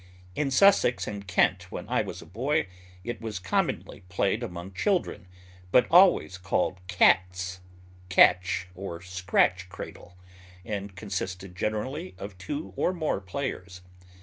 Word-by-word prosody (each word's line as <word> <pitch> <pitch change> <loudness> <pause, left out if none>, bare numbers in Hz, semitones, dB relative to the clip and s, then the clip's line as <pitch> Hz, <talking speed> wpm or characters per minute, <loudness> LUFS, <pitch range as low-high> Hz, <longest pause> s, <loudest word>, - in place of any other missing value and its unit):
In 140 +8 -1
Sussex 135 -3 +4
and 100 -1 -6
Kent, 90 - +1
when - - -6
I - - +1
was - - -6
a - - -15
boy, 130 - 0 0.4
it 120 +3 -5
was 110 -3 -4
commonly 90 - -2
played 100 +4 0
among 95 -4 -6
children, 175 - -1 0.4
but 125 - +6
always 175 - +5
called 90 +1 0
cat's, 90 0 +2 0.5
catch, 90 -1 +4
or 90 -2 -6
scratch 90 0 +1
cradle, 90 0 -10 0.5
and 100 -3 -5
consisted 95 -2 -5
generally 105 0 -3
of 100 0 -8
two 145 +11 -5
or 185 - +1
more 155 - -1
players. 95 -4 -5
95 Hz, 130 wpm, -27 LUFS, 90-120 Hz, 0.5 s, but